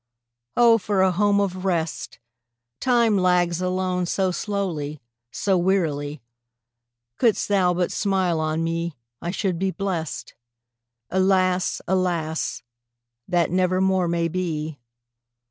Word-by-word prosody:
Oh, 235 -1 +6
for 195 -1 +1
a 190 - +4
home 200 +2 +2
of 185 -2 -1
rest! 170 -4 -2 0.6
Time 235 -5 +3
lags 180 -1 +2
alone 185 -1 -1
so 190 +1 +1
slow, 175 -7 -3 0.3
so 190 +8 +1
wearily; 155 - 0 1.0
Couldst 230 -3 +2
thou 185 -3 +2
but 180 0 0
smile 190 -5 +1
on 155 +1 -1
me, 165 -1 -2 0.3
I 170 - -3
should 185 -2 -1
be 190 +1 +1
blest. 185 -6 -4 0.8
Alas, 185 -1 +2
alas! 170 -8 -1 0.6
that 175 -3 +1
never 185 0 +2
more 190 -1 +2
may 170 0 0
be. 160 -4 -3
185 Hz, 115 wpm, -23 LUFS, 170-190 Hz, 1.0 s, Oh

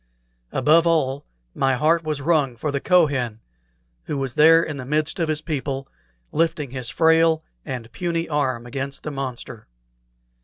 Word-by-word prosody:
Above 155 +6 +4
all, 145 -4 +1 0.3
my 135 -1 +1
heart 160 +5 +2
was 155 -2 -3
wrung 145 -6 +2
for 145 +6 -3
the 140 - -1
Kohen, 140 -11 +2 0.7
who 145 - -3
was 135 -2 -2
there 165 +3 +6
in 150 -2 -5
the 130 - -6
midst 150 +5 -1
of 165 -2 0
his 155 0 -1
people, 135 -3 -3 0.4
lifting 160 -4 0
his 130 -3 -4
frail 160 -1 +3 0.2
and 120 -4 -6
puny 170 +5 -2
arm 130 -6 -1
against 135 +2 -5
the 150 - -4
monster. 130 -4 -6
145 Hz, 155 wpm, -22 LUFS, 130-160 Hz, 0.7 s, there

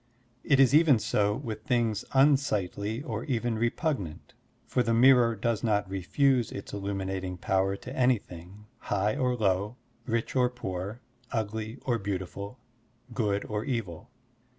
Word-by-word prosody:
It 140 -2 +3
is 135 -1 +6
even 150 -4 +6
so 105 -1 +1
with 110 -5 -6
things 115 -4 +1
tmsightly 125 - +1
or 110 -2 -3
even 120 -2 -1
repugnant, 120 - -2 0.3
for 125 - 0
the 115 -1 +1
miitor 120 -2 +5
does 115 0 0
not 105 -3 +1
refuse 115 +7 +1
its 100 - -7
illtmiinating 95 -2 -3
power 95 -4 +1
to 125 +6 -9
anything, 105 -6 -1
high 105 +1 0
or 125 -1 +1
low, 100 0 0 0.3
rich 115 +1 -1
or 125 -1 +3
poor, 100 -2 -5 0.3
ugly 110 +1 -3
or 120 -3 +1
beautiful, 100 +3 -5 0.6
good 105 -3 0
or 105 0 -3
evil. 115 - -4
110 Hz, 135 wpm, -28 LUFS, 100-125 Hz, 0.6 s, is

